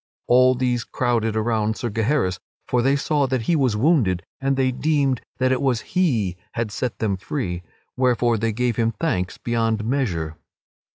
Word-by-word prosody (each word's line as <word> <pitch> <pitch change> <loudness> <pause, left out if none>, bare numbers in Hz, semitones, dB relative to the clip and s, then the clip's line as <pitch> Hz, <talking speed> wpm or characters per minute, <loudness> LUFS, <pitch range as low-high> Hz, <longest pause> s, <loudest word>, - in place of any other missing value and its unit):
All 130 +1 +5
these 125 -2 0
crowded 115 -4 0
around 110 -1 0
Sir 120 - -3
Gaheris, 110 -3 0 0.3
for 125 - +2
they 135 +3 +3
saw 140 0 +1
that 130 -3 -1
he 170 - +2
was 130 -8 +2
wounded 110 - +2 0.2
and 135 0 0
they 130 -1 +2
deemed 140 -2 +1 0.2
that 130 0 +2
it 130 - +1
was 130 -4 +1
he 115 - +1 0.2
had 115 -2 -2
set 125 +3 -3
them 100 -4 -1
free, 95 -4 -3 0.3
wherefore 120 -3 +2
they 115 +1 0
gave 120 +1 -1
him 115 -1 +1
thanks 90 0 -1
beyond 115 -2 -1
measure. 90 - -1
120 Hz, 170 wpm, -22 LUFS, 110-130 Hz, 0.3 s, All